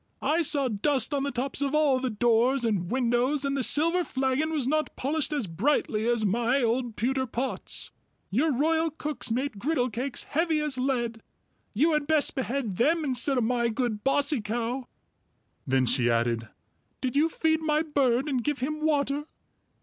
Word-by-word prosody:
I 310 +5 +2
saw 290 -4 +1
dust 260 +6 0
on 280 - 0
the 280 - -1
tops 260 +2 -3
of 280 +1 0
all 290 -4 +3
the 260 0 -1
doors 240 +3 +2
and 195 -6 -1
windows, 255 +3 +1
and 275 0 0
the 275 - 0
silver 335 +7 +3
flagon 270 +2 -1
was 290 -6 -1
not 310 +2 0
polished 300 +3 -1
as 290 -6 -1
brightly 215 - 0
as 235 -3 +1
my 235 +6 +1
old 235 0 0
pewter 260 +3 -1
pots. 245 +3 -2 0.4
Your 290 +10 +2
royal 320 +5 +1
cooks 300 -3 -4
make 245 -1 -2
griddlecakes 255 -1 -1
heavy 320 0 0
as 300 -4 -1
lead; 240 -4 -1 0.5
you 310 +9 +3
had 300 -1 0
best 310 -2 +2
behead 255 -6 -3
them 320 +6 +2
instead 265 +1 0
of 245 - +2
my 235 0 +1
good 225 -2 -2
Bossy 280 -1 +1
Cow." 240 +4 -3 0.8
Then 130 -1 +2
she 120 0 +2
added, 115 -1 0 0.5
"Did 255 -1 -2
you 310 +3 +3
feed 320 0 +1
my 310 0 +1
bird 275 -4 +1
and 260 -5 -1
give 295 +1 -1
him 305 +4 -3
water?" 290 -1 +1
265 Hz, 170 wpm, -27 LUFS, 235-295 Hz, 0.8 s, all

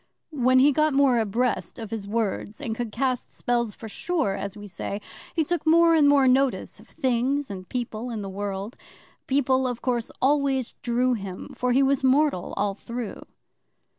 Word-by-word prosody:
When 255 -2 +3
he 275 +3 +6
got 305 0 +2
more 270 -4 +4
abreast 225 +4 -1
of 225 -4 -7
his 215 -3 -4
words, 215 0 -2
and 255 -6 -3
could 235 -1 -4
cast 255 +1 -1
spells 235 -3 -1
for 225 - -9
sure, 310 - -1
as 200 +1 -5
we 205 - -9
say, 200 +1 -5 0.4
he 325 - +3
took 345 +3 -1
more 330 +1 +5
and 300 -3 +5
more 280 -2 +5
notice 265 +1 +1
of - - -17
things 265 -1 0
and 185 -2 -8
people 240 -1 -4
in 220 -3 -4
the - - -5
world. 200 +2 -4 0.5
People, 265 -1 +2
of 245 -2 -4
course, 240 -3 0
always 270 -2 +1
drew 250 +1 +1
him, 195 -5 -6
for 250 0 0
he 265 +3 +4
was 270 0 +2
mortal 265 -7 +2
all 205 -1 +1
through. 235 +2 -6
250 Hz, 180 wpm, -25 LUFS, 215-275 Hz, 0.5 s, he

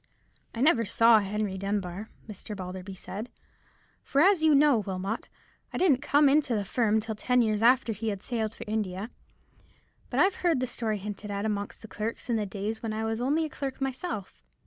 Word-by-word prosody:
"I 230 - -3
never 270 -5 +4
saw 230 +2 +5
Henry 200 -1 -2
Dunbar," 195 0 -3 0.2
Mr. 210 0 -7
Balderby 185 0 -7
said; 210 +5 -7 0.7
"for, 275 - 0
as 370 +2 +5
you 315 -2 +5
know, 280 -4 +5
Wilmot, 195 +2 -4 0.4
I - - -4
didn't 295 -9 +3
come 290 0 +4
into 275 -3 +3
the 205 -2 -1
firm 220 +1 +2
till 220 +1 -4
ten 250 +3 +2
years 215 -1 0
after 240 0 +4
he 215 +1 -2
sailed 225 0 -3
for - - -7
India; 210 0 -3 1.0
but - - -1
I've 380 +1 +4
heard 335 -6 +2
the 255 - 0
story 225 -3 -2
hinted 205 +1 -6
at 200 +1 -2
amongst 205 -1 -3
the - - -8
clerks 220 +4 -4
in - - +2
the 210 -2 -1
days 210 +3 -4
when 225 -2 -3
I 220 +1 -2
was 225 +1 -2
only 295 +6 +1
a - - -5
clerk 275 -2 -5
myself." 270 - -4
220 Hz, 190 wpm, -28 LUFS, 205-255 Hz, 1.0 s, saw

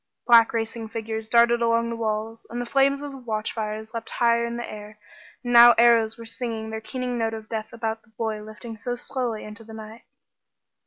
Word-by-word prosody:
Black 230 -2 +7
racing 225 0 -3
figures 220 0 -4
darted 235 0 +4
along 230 0 +2
the - - -3
walls, 225 0 -3
the 240 +1 -4
flames 275 +2 +2
of 290 - -5
the 270 - -9
watchfires 220 -1 -4
leapt 230 -1 -4
higher 235 0 +2
in 235 0 -4
the 240 - -5
air, 210 0 -10 0.5
and 245 0 -2
now 240 0 +10
arrows 230 -1 +4
were 230 - -9
singing 225 -1 -4
their 220 0 -5
keening 250 0 -4
note 225 0 -1
of 220 -1 -9
death 220 -1 -4
about 225 -1 -3
the 235 - -29
boy 220 -2 -2
lifting 215 +1 -10
so 245 +2 -3
slowly 245 -3 -3
into 215 +2 -8
the 220 0 -12
night. 220 +1 -10
230 Hz, 200 wpm, -24 LUFS, 220-235 Hz, 0.5 s, now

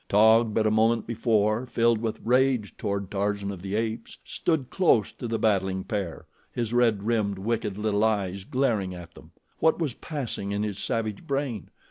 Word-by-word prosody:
Taug, 110 +2 +5
but 110 - +2
a 110 - +3
moment 115 +2 +3
before 110 0 +1
filled 115 -1 +2
with 115 -2 -2
rage 125 -2 +2
toward 100 -2 -3
Tarzan 100 0 -1
of 95 -3 -8
the 95 +2 -3
Apes, 110 0 -3
stood 155 -7 -1
close 160 - +3
to 120 - -7
the 115 0 -1
battling 95 -3 +1
pair, 95 -6 -4 0.3
his 120 -1 -3
red 115 -5 +3
rimmed, 105 -3 0
wicked 105 0 -2
little 105 -1 +1
eyes 100 -3 0
glaring 110 -8 0
at 85 -1 -10
them. - - -15 0.3
What 160 - +3
was 155 -7 -1
passing 120 -9 -4
in 105 +1 -1
his 105 -3 -3
savage 115 +3 -3
brain? 135 - -2
110 Hz, 175 wpm, -26 LUFS, 100-120 Hz, 0.3 s, Taug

